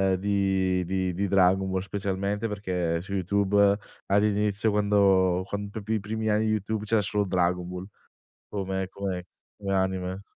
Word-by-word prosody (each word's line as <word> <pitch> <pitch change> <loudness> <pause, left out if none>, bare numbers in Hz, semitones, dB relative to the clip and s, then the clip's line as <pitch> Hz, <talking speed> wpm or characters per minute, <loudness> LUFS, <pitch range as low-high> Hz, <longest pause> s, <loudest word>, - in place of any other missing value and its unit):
di 95 -1 +1
di 95 0 -1
di 100 +3 -1
Dragon 95 0 +3
Ball, 95 0 0
specialmente 100 +2 -2
perché 90 -5 -1
su 100 +2 -7
YouTube, 100 +1 +3 0.3
all'inizio 105 +1 +2
quando 100 -3 +3
quando, 100 0 -4
proprio 110 +1 -4
i - - 0
primi 110 +2 -3
anni 105 +1 +2
di 110 - +1
Youtube, 110 0 -1
c'era 110 0 +2
solo 100 +2 0
Dragon 90 -1 +1
Ball 90 +1 -6 0.7
come 95 -1 -2
come 95 -2 -4 0.3
come 100 -1 -2
anime. 95 0 -1
100 Hz, 150 wpm, -27 LUFS, 95-105 Hz, 0.7 s, Dragon